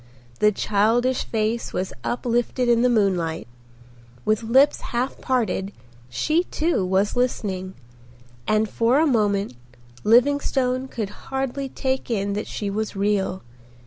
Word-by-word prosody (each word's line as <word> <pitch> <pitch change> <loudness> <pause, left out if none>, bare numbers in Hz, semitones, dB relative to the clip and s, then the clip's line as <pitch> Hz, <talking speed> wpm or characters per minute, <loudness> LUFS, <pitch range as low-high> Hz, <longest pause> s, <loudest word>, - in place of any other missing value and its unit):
The 210 - +5
childish 225 +6 +1
face 225 +1 -2
was 185 +1 -2
uplifted 240 +1 -1
in 235 -1 +4
the 250 - +4
moonlight. 180 - 0 0.8
With 215 0 +2
lips 265 +6 +4
half 245 +2 -3
parted 215 -6 0 0.4
she 310 - +1
too 320 - 0
was 190 +2 +1
listening, 195 -7 -2 0.7
and 215 0 +2
for 235 +6 +2
a 320 - +4
moment 205 - +1 0.5
Livingstone 255 +2 +2
could 215 -6 -4 0.2
hardly 270 0 -2
take 260 0 -2
in 200 -3 -1
that 210 +1 -3
she 205 - -4
was 210 +2 -3
real. 195 -1 0
225 Hz, 125 wpm, -23 LUFS, 200-255 Hz, 0.8 s, The